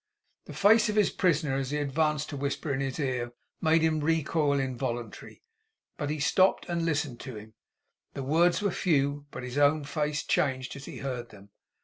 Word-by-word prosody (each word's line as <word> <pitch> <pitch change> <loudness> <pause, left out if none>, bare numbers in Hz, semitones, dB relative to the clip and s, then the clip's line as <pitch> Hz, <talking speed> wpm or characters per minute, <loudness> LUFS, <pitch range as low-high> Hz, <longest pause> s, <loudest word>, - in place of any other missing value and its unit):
The - - -9
face 215 +2 +5
of 210 - -1
his 210 -2 +3
prisoner 150 -7 +1
as 135 -1 -2
he 150 - -1
advanced 150 +1 0
to 145 - -5
whisper 140 +1 -2
in 135 - -1
his 135 +1 -3
ear, 125 -4 -2 0.3
made 160 +1 +3
him 160 -1 +2
recoil 155 -2 +1
involuntarily. 120 -4 -4 0.5
But 145 -2 -3
he 155 0 -2
stopped 185 +6 +3
and 170 -1 -1
listened 145 -6 -1
to 130 - -7
him. 110 +1 -11 0.6
The 135 - -4
words 170 +7 +3
were 200 - +2
few, 145 -4 0
but - - -8
his 125 +3 -3
own 145 +1 +4
face 150 0 -2
changed 130 -3 0
as 140 0 -9
he - - -8
heard 125 -3 -4
them. 100 -2 -16
145 Hz, 190 wpm, -28 LUFS, 130-160 Hz, 0.6 s, face